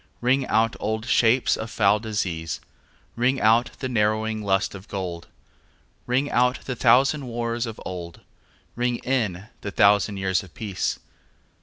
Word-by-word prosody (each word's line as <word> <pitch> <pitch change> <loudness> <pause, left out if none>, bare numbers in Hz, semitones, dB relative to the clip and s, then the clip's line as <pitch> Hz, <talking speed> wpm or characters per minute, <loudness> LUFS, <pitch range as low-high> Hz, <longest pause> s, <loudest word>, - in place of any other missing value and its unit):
Ring 130 +2 +1
out 110 +1 +2
old 110 +1 -2
shapes 120 +1 +3
of 110 - -6
foul 105 -1 +3
disease, 95 -7 -3 0.6
Ring 125 +3 +1
out 115 +3 +4
the 130 - -1
narrowing 110 -1 0
lust 95 -1 0
of 100 +1 -10
gold; 90 -4 -5 0.8
Ring 130 +3 +1
out 125 +1 +2
the 130 - -3
thousand 130 +4 +3
wars 120 0 -2
of 110 - -7
old, 85 -2 -7 0.5
Ring 120 0 0
in 105 -8 -1 0.2
the 100 - -4
thousand 100 0 +3
years 95 -1 0
of 95 -4 -15
peace. 100 -4 -2
110 Hz, 145 wpm, -24 LUFS, 100-120 Hz, 0.8 s, out